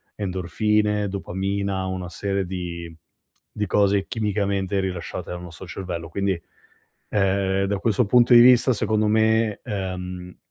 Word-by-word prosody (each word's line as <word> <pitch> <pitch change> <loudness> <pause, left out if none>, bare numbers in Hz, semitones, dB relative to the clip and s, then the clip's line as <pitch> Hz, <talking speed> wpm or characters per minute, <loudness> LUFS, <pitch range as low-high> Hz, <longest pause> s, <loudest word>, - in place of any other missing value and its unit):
endorfine, 105 +2 0
dopamina, 95 0 -2
una 95 -1 -4
serie 100 0 -2
di 85 -2 -6 0.6
di 105 -1 -2
cose 100 0 +2
chimicamente 100 -3 -1
rilasciate 90 -3 -4
dal 90 - -5
nostro 90 +1 -10
cervello. 85 -1 -5
Quindi, 95 -1 -1 0.7
ehm, 95 -1 +1
da 100 0 -1
questo 110 +1 +1
punto 120 +3 +5
di 120 - +10
vista 125 +1 +6
secondo 110 0 +1
me, 110 0 +2
ehm, 90 -4 -5
100 Hz, 125 wpm, -23 LUFS, 90-105 Hz, 0.7 s, di